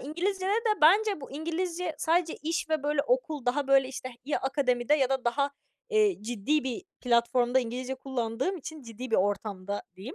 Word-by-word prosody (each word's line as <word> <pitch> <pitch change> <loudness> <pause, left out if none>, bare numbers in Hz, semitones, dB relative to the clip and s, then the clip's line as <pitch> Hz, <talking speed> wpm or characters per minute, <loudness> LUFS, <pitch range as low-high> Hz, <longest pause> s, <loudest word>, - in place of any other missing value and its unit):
İngilizcede 375 +6 -2
de 435 -1 +1
bence 395 +3 +5
bu 270 - -9
İngilizce 335 +3 -3
sadece 335 0 +1
iş 330 +3 -1
ve, 310 -2 +1
böyle, 290 0 +1
okul 315 - -1
daha, 275 +3 +1
böyle, 270 -1 +4
işte, 255 -1 -6 0.2
ya 290 - 0
akademide 265 -1 +1
ya 270 -3 +2
da 265 -2 0
daha, 280 +4 +1 0.4
eee, 425 - +3
ciddi 245 +7 0
bir 260 +6 -3 0.2
platformda 240 +1 +3
İngilizce 250 +2 -4
kullandığım 260 +5 -2
için 315 -2 -8
ciddi 235 +1 -8
bir - - +3
ortamda 200 0 -1
diyeyim. 230 - -8
275 Hz, 170 wpm, -29 LUFS, 245-335 Hz, 0.4 s, bence